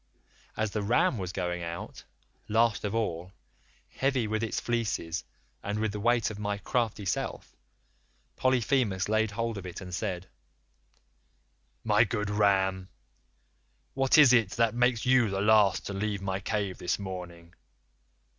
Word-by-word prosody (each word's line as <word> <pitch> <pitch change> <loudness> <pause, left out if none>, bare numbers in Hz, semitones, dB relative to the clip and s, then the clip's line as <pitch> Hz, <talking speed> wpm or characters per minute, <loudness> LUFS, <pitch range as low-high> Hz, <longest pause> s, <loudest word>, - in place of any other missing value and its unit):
As 110 -1 -1
the 105 - -2
ram 115 +2 +2
was 90 -1 -4
going 90 -2 -3
out, 85 0 -7 0.4
last 115 0 +2
of 105 +1 -2
all, 90 -5 -2 0.5
heavy 135 -3 0
with 110 0 -1
its 115 - -1
fleece 100 -8 -2 0.4
and 105 +1 -3
with 110 0 0
the 105 - -5
weight 120 +1 +2
of 105 - -8
my 105 -1 -2
crafty 110 -1 -2
self, - - -3 0.8
Polyphemus 125 -6 +1
laid 110 +1 +1
hold 115 0 -3
of 95 - -10
it 90 - -7
and 90 -2 -9
said: 90 -2 -3 1.6
"'My 110 0 +4
good 105 -2 -2
ram, 95 -2 +1 1.0
what 135 +2 +3
is 145 -5 +8
it 115 -6 +4
that 115 -2 +2
makes 120 -1 +1
you 125 -3 +4
the 95 0 -2
last 105 -1 +4
to 100 - -4
leave 100 0 -2
my 95 0 -2
cave 100 -3 -2
this 90 - -1
morning? 90 -3 -8
105 Hz, 145 wpm, -29 LUFS, 95-115 Hz, 1.6 s, is